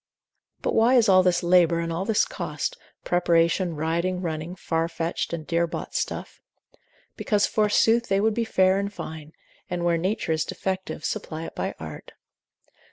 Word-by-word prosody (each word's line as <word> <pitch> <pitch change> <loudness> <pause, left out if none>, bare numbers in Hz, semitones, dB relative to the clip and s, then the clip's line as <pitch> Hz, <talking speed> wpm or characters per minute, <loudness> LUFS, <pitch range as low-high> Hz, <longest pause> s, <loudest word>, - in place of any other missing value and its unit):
But - - 0
why 235 +3 +4
is 240 -3 +5
all 185 -1 +6
this 180 -1 +2
labour, 175 -1 +4
all 170 +4 -2
this 220 -1 +2
cost, - - -4 0.3
preparation, 170 0 +2
riding, 170 +4 -1
running, 165 0 -4
far 165 -3 -1
fetched, 165 0 -3
and 165 -2 -4
dear 170 +1 +1
bought - - -6
stuff? - - -4 0.7
Because 205 -2 +1
forsooth 225 +2 +2
they 195 0 +2
would 220 +2 +2
be 230 +2 0
fair 190 -3 +3
and 200 0 -2
fine, 155 -5 -8 0.4
and 175 -1 -2
where 170 -1 +2
nature, 185 0 -1
is 155 -1 +1
defective, 190 -4 -4
supply 160 0 -4
it - - -8
by - - -3
art. - - -9
180 Hz, 165 wpm, -25 LUFS, 165-200 Hz, 0.7 s, all